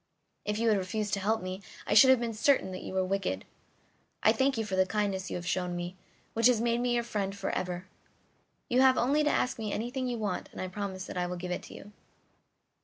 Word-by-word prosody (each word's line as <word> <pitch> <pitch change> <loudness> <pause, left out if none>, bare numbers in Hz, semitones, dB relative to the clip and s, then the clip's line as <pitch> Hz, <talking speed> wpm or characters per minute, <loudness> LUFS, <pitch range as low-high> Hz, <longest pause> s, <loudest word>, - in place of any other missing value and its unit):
If 210 0 -1
you 230 +1 +2
had 210 -2 +3
refused 205 +2 -2
to 200 - +1
help 215 +1 0
me 185 +1 -5 0.2
I - - 0
should 240 +5 +8
have 260 -2 +6
been 235 -1 -2
certain 230 -2 +2
that 185 - -6
you - - -6
were 190 0 +2
wicked. 185 - -2 0.8
I 215 - +7
thank 265 +2 +2
you 225 - -1
for 195 -2 -2
the 185 0 +3
kindness 200 -2 -1
you - - -4
have 175 - -5
shown 180 -1 -1
me, 175 +1 -4 0.4
which 230 +1 +5
has 245 -3 +4
made 235 +1 +1
me 245 0 +1
your 235 - +1
friend 200 -4 -2
for 195 - -2
ever. 180 0 -3 0.8
You 250 +2 +3
have 260 -1 +6
only 285 +5 +3
to 295 - +3
ask 250 - 0
me 215 -1 -3
for - - -2
anything 250 +3 -2
you 245 -1 -2
want 210 -4 -3
and - - -10
I 185 - -3
promise 190 -1 -4
that - - -7
I 180 0 0
will 180 0 -4
give 180 +1 -5
it 180 - -2
to - - -11
you." 205 - -11
210 Hz, 250 wpm, -30 LUFS, 185-235 Hz, 0.8 s, should